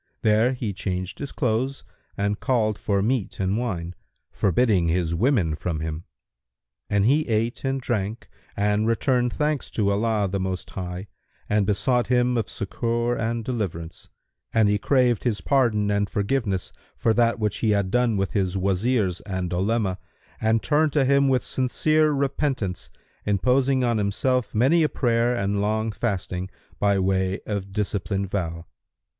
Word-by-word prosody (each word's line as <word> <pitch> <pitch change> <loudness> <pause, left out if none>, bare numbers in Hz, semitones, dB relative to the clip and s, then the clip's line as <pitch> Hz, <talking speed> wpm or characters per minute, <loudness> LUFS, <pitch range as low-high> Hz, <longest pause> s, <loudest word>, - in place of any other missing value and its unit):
there 110 +4 +3
he 115 -5 -3
changed 95 0 -4
his 140 -2 -5
clothes 125 +2 -1 0.3
and 100 +1 -1
called 110 -5 +1
for 100 -2 0
meat 120 -2 -1
and 95 +1 0
wine, 90 -8 -3 0.4
forbidding 100 -2 +2
his 85 0 0
women 95 - +2
from 80 +1 -3
him; 80 +1 -4 0.8
and 100 -1 +2
he 150 +6 +3
ate 115 +1 -1
and 135 0 -1
drank 110 -2 -2 0.3
and 105 +2 +1
returned 125 +1 +1
thanks 150 +1 -1
to 100 -2 0
Allah 105 0 +1
the 95 +1 -2
Most 95 -1 -3
High 90 0 -5 0.4
and 105 -2 +1
besought 120 +4 +1
Him 125 0 +2
of 115 -4 -1
succour 115 +4 -1
and 115 0 -2
deliverance, 90 -9 -4 0.4
and 110 -2 +3
he 105 0 +2
craved 125 -2 +2
His 115 -4 0
pardon 115 -7 +2
and 100 0 0
forgiveness 100 -3 -1 0.2
for 115 - +2
that 115 0 +2
which 105 -2 -1
he 110 - 0
had 100 -3 +1
done 120 -3 +2
with 95 0 -1
his 95 -4 0
Wazirs 95 0 0
and 95 -2 -3
Olema 95 0 0 0.4
and 110 0 +2
turned 150 -1 +2
to 145 -3 +3
Him 140 +1 +4
with 130 -2 +1
sincere 155 +4 +2
repentance, 135 -8 -1 0.3
imposing 130 +6 +2
on 120 -2 +1
himself 110 +4 0
many 135 +10 +4
a 155 - +3
prayer 120 -1 +1
and 100 -2 0
long 110 +2 0
fasting, 95 -4 -3 0.3
by 100 -1 +3
way 95 0 +1
of 100 -2 -4
discipline 100 -1 -2
vow. 85 -4 -3
110 Hz, 155 wpm, -24 LUFS, 95-125 Hz, 0.8 s, Him